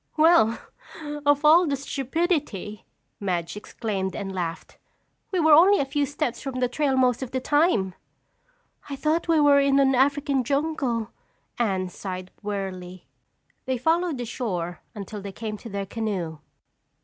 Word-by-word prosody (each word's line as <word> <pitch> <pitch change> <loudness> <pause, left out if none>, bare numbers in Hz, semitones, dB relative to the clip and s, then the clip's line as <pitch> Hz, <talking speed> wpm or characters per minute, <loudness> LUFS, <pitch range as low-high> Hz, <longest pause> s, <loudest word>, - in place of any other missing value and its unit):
"Well, 310 -8 +5 0.7
of 290 +1 +3
all 335 +3 +7
the 285 - +1
stupidity!" 275 - -2 0.3
Madge 180 -4 -2
exclaimed 200 -3 -4
and 195 -2 -5
laughed. 170 -3 -5 0.5
"We 370 - 0
were 315 -2 +5
only 370 +7 +7
a 280 - +1
few 285 +1 -1
steps 290 -3 -3
from 270 -1 -5
the 250 - +2
trail 270 +1 0
most 250 -1 +2
of 260 - -4
the 260 - -2
time." 260 - +2 1.0
"I 280 - -3
thought 310 +5 0
we 330 -2 +4
were 290 -1 +6
in 275 0 +3
an 270 -1 +4
African 275 +1 +2
jungle," 270 -5 -1 0.5
Anne 190 -5 0
sighed 185 0 -7
wearily. 185 -3 -5 0.6
They 260 -1 -1
followed 325 +3 +1
the 245 - -4
shore 180 -8 -4
until 205 0 -7
they 200 0 -6
came 215 +2 -5
to 230 - -10
their 200 -1 -3
canoe. 190 -7 -3
250 Hz, 150 wpm, -25 LUFS, 200-290 Hz, 1.0 s, all